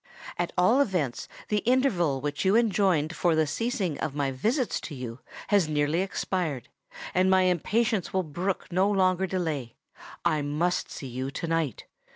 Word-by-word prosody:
At 175 0 -2
all 220 +10 +5
events 175 - -1 0.2
the 210 - +2
interval 195 - +2
which 145 -1 -2
you 190 +2 +3
enjoined 190 -8 +2
for 170 -2 +2
the 160 0 +3
cessation 190 - -2
of 140 - -3
my 140 -2 0
visits 230 - 0
to 155 - -7
you, 125 -2 -6 0.3
has 200 -6 +3
nearly 150 +3 +1
expired; 180 - -2 0.4
and 185 +1 +3
my 190 0 +5
impatience 200 +4 +1
will 190 0 +1
brook 175 +6 -3
no 185 +3 +3
longer 190 -2 +2
delay. 155 -10 -3 0.5
I 155 -1 +2
must 155 +5 -1
see - - -7
you 130 +1 -4
to 150 +5 -5
night! 165 -7 -1
175 Hz, 165 wpm, -27 LUFS, 145-195 Hz, 0.5 s, all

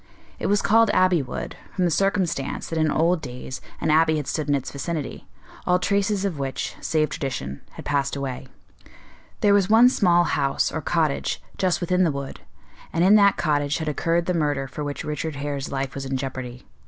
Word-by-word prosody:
It - - -1
was 205 0 +2
called 225 +1 +5
Abbey 185 -3 +4
Wood, 130 - -6 0.2
from 185 - +1
the 175 - +1
circumstance 185 -6 0
that 165 - -2
in 155 0 +2
old 165 +3 +2
days 125 -1 -7 0.2
an - - +1
abbey 160 0 +4
had 150 - -3
stood 150 0 -2
in 145 - +4
its 135 - -3
vicinity, 150 +1 -5 0.4
all 180 - +4
traces 200 +1 0
of 175 -7 -2
which, 135 -1 -3
save 155 -1 +1
tradition, 100 - -4
had - - -10
passed 140 -1 0
away. 135 -1 -4 0.9
There 205 -1 +5
was 200 -1 +3
one 230 +3 +7
small 175 -8 +3
house, 145 -4 0
or 160 - -3
cottage, 155 -2 0 0.2
just 185 -1 0
within 180 +1 +2
the 165 - +2
wood, 140 -1 -6 0.5
and 170 - +1
in 190 +3 +6
that 200 -1 +5
cottage 145 -2 +1
had 160 - -4
occurred 165 +3 0
the 180 - 0
murder 145 -5 0
for 150 +3 -6
which 145 -1 -4
Richard 150 0 -3
Hare's 140 -1 -4
life 135 -1 -2
was 135 - -5
in 135 0 -1
jeopardy. 130 -2 -6
155 Hz, 195 wpm, -24 LUFS, 140-180 Hz, 0.9 s, one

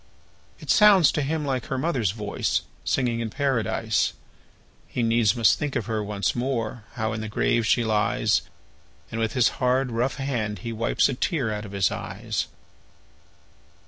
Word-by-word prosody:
It - - -2
sounds 205 -6 +6
to 150 - -1
him 150 +2 -1
like 130 -3 -2
her 130 - -2
mother's 130 - 0
voice, 105 +1 -1 0.2
Singing 120 -3 0
in 115 -1 -2
Paradise! 115 -4 0 0.7
He 120 - -2
needs 115 -1 +3
must 115 -2 +4
think 145 -2 -3
of 110 - -1
her 110 -2 -2
once 100 -1 -1
more 120 -3 -2
How 110 -2 -2
in 110 - -4
the 110 - -5
grave 110 +1 +1
she 120 - +3
lies; 105 -1 +2 0.7
And 115 - -3
with 110 - 0
his 125 -4 +4
hard, 125 0 +2
rough 120 +3 0
hand 120 -7 -2
he 115 - -3
wipes 115 +1 +2
A 135 - -2
tear 130 - -1
out 105 0 -5
of 100 - -9
his 100 -1 +2
eyes. - - -3
115 Hz, 170 wpm, -25 LUFS, 110-135 Hz, 0.7 s, sounds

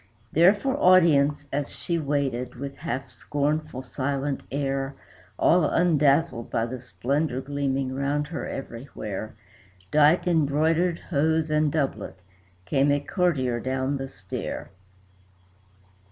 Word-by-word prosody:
There 175 +6 +6
for 265 +6 -1
audience 150 - +4
as 145 0 -1
she 170 -1 -3
waited, 140 -4 -1
with 140 +2 -7
half 135 -4 -4
scornful, 145 -2 -2
silent 135 +2 -2
air 135 0 -2 0.4
All 175 +1 +4
undazzled 150 -5 +2
by 115 - 0
the 125 +1 -6
splendor 130 +2 -1
gleaming 135 -1 -2
round 140 +2 -1
her 165 - -4
everywhere, 115 -5 -6 0.6
Dight 150 +3 +5
in 165 -5 +3
broidered 165 +4 +2
hose 160 +1 +1
and 150 -1 +2
doublet, 140 -9 -2 0.5
came 135 +8 +2
a 145 - +3
courtier 145 -7 0
down 130 +3 -1
the 135 0 -4
stair. 100 -8 -6
140 Hz, 120 wpm, -25 LUFS, 135-155 Hz, 0.6 s, There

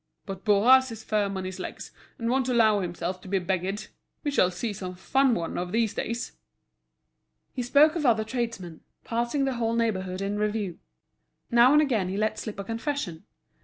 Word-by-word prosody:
But 195 -1 -7
Bourras 245 +5 +5
is 220 -1 -8
firm 205 -3 0
on 190 - -4
his 185 0 -6
legs, - - -7 0.3
and 230 - -3
won't 260 +1 +1
allow 220 -4 +4
himself 180 0 -4
to - - -12
be 195 +1 +1
beggared. 190 +2 -2 0.4
We 290 - -1
shall 185 -10 +3
see 205 +5 -3
some 185 -2 -6
fun 265 +7 +2
one 165 0 -3
of 180 0 -4
these 225 -1 +1
days." 235 +1 -3 1.2
He 255 - -3
spoke 290 +6 +5
of 330 - -1
other 225 -5 +3
tradesmen, 220 -8 -4 0.2
passing 240 +4 -1
the 270 - 0
whole 230 -1 0
neighbourhood 190 -5 -1
in 205 +1 -2
review. 210 -4 -2 0.7
Now 240 +2 +6
and 300 +1 +6
again 220 -10 0
he 190 - -3
let 215 +1 0
slip 215 - -6
a 200 - -4
confession. 225 - -4
220 Hz, 185 wpm, -27 LUFS, 190-240 Hz, 1.2 s, Now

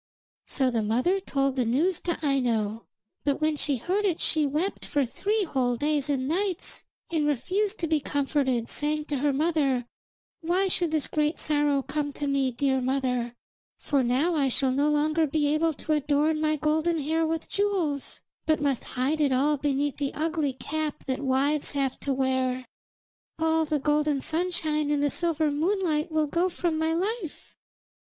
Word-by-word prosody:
So 265 -3 +2
the 230 -2 0
mother 250 - +1
told 275 -7 -1
the 255 - +1
news 305 +10 +1
to 345 -2 -2
Aino, 230 -6 0 0.4
but 280 -1 0
when 310 0 +1
she 285 -2 0
heard 370 - -1
it 365 -5 +1
she 310 -2 +1
wept 315 +8 -2
for 285 -2 0
three 410 - -1
whole 255 -7 0
days 295 +2 0
and 265 -2 0
nights 365 +3 -1 0.3
and 310 -3 +1
refused 385 - 0
to 335 - -2
be 315 -1 +2
comforted, 270 -4 0
saying 300 +1 -1
to 290 - 0
her 285 +2 +1
mother: 280 -4 +1 0.5
'Why 365 +3 +1
should 350 -2 +1
this 310 -2 0
great 300 +1 0
sorrow 290 -2 +2
come 290 0 -3
to 290 - -4
me, 275 -2 +1
dear 265 +1 0
mother, 250 -2 -1 0.4
for 280 -2 0
now 260 +8 +2
I 280 -4 +2
shall 260 +1 +1
no 285 +3 +2
longer 305 +2 +2
be 295 0 +1
able 320 +1 +2
to 310 - -6
adorn 300 +1 +1
my 310 0 +2
golden 315 +3 +1
hair 320 +2 0
with 320 0 -2
jewels, 370 -9 -1 0.3
but 315 -1 +3
must 280 -3 0
hide 275 +5 +1
it 285 -2 +3
all 280 +4 +3
beneath 285 0 -1
the 280 -1 -3
ugly 310 -3 -1
cap 305 +3 -4
that 260 0 -2
wives 280 +2 +1
have 275 -2 -1
to 280 - -2
wear. 260 -1 0 0.7
All 320 0 +2
the 305 0 0
golden 295 0 +1
sunshine 315 -2 0
and 290 -1 +1
the 290 - +2
silver 320 -3 +1
moonlight 320 0 0
will 310 -1 +2
go 340 +5 +1
from 340 -2 -1
my 320 0 +1
life.' 370 +1 -3
295 Hz, 175 wpm, -27 LUFS, 275-320 Hz, 0.7 s, but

